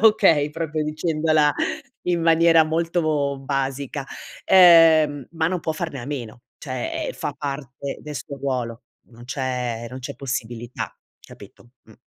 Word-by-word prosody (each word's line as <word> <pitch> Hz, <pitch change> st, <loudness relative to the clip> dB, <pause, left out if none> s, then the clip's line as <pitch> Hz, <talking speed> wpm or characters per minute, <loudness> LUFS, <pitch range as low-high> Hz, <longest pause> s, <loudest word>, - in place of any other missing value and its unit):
okay, 190 Hz, -9 st, +5 dB
proprio 155 Hz, -1 st, -3 dB
dicendola 155 Hz, -1 st, +1 dB, 0.5 s
in 175 Hz, -2 st, +1 dB
maniera 165 Hz, 0 st, +5 dB
molto 155 Hz, -3 st, 0 dB
basica; 135 Hz, 0 st, -3 dB, 0.4 s
ehm, 165 Hz, -6 st, +6 dB
ma 160 Hz, 0 st, 0 dB
non 180 Hz, -2 st, -2 dB
può 160 Hz, -, -2 dB
farne 155 Hz, -4 st, -5 dB
a 120 Hz, -, -8 dB
meno, 120 Hz, -5 st, -6 dB, 0.2 s
cioè, 130 Hz, -3 st, -4 dB
ehm, -, -, -4 dB
fa -, -, -5 dB
parte 140 Hz, -1 st, -5 dB
del 150 Hz, -1 st, -8 dB
suo 140 Hz, +3 st, -7 dB
ruolo. 125 Hz, -4 st, -3 dB, 0.3 s
Non 120 Hz, 0 st, -14 dB
c'è 125 Hz, -3 st, -3 dB
non 130 Hz, -, -7 dB
c'è 135 Hz, +2 st, -6 dB
possibilità 120 Hz, -2 st, -5 dB, 0.3 s
capito, 120 Hz, -, -15 dB
mh. 110 Hz, -, -18 dB
145 Hz, 140 wpm, -23 LUFS, 130-160 Hz, 0.5 s, ehm